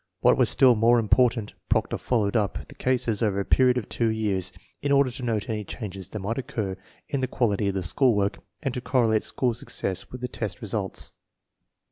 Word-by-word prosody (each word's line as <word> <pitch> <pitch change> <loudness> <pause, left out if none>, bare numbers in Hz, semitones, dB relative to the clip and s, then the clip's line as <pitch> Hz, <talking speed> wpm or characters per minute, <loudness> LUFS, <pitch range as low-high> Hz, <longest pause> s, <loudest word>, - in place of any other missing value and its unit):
What - - +5
was - - +3
still 130 -2 +6
more 115 +2 +4
important, 115 -1 +2 0.2
Proctor - - +1
followed 110 -4 0
up 105 -4 -1
the - - -12
cases 120 -4 0
over 100 -3 +1
a 100 - -1
period 125 -1 +4
of 125 - -3
two 115 - 0
years, 100 -5 -1 0.3
in 145 - -1
order 140 -2 +4
to 130 +2 -5
note 115 -4 -1
any 110 -2 -2
changes 95 -3 -7
that 110 - -6
might 105 +5 -2
occur 105 -7 -3 0.3
in 140 - -2
the 130 - 0
qual 120 -3 +1
ity 100 0 0
of 100 - -1
the 95 - -1
school 125 +6 +3
work 100 -1 0 0.2
and 135 -3 -1
to 125 - -3
correlate 115 -3 +2
school 125 -2 0
success 95 -5 -3
with 125 - -9
the 125 - -2
test - - -5
results. - - -2
115 Hz, 210 wpm, -26 LUFS, 100-125 Hz, 0.3 s, still